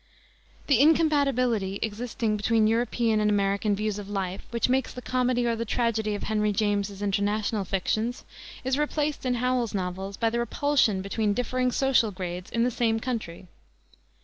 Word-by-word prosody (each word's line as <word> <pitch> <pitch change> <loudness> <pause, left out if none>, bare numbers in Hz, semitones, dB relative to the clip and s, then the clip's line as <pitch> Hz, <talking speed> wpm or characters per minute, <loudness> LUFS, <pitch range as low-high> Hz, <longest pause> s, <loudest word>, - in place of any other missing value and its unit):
The 275 -5 +3
incompatibility 270 - +3
existing 220 0 -2
between 215 +1 +2
European 225 0 +1
and 210 0 +2
American 200 0 +1
views 210 0 -2
of 200 -1 -8
life, 195 -2 -3
which 235 -1 0
makes 260 +1 +1
the - - -8
comedy 250 -1 +1
or 235 -1 +1
the 230 - -2
tragedy 220 -2 0
of 205 - -6
Henry 210 -1 +1
James's 205 -1 -1
international 205 +1 0
fictions, 215 +6 -1 0.4
is 260 +2 0
replaced 295 -2 -1
in 250 - +1
Howells's 245 -3 0
novels 190 +1 -4
by 225 -1 +1
the 235 - -1
repulsion 235 -4 +1
between 205 +1 0
differing 250 +1 0
social 265 -4 +2
grades 180 -2 -6
in 230 - 0
the 250 - +1
same 225 -1 +1
country. 220 -8 -4
225 Hz, 160 wpm, -26 LUFS, 205-250 Hz, 0.4 s, The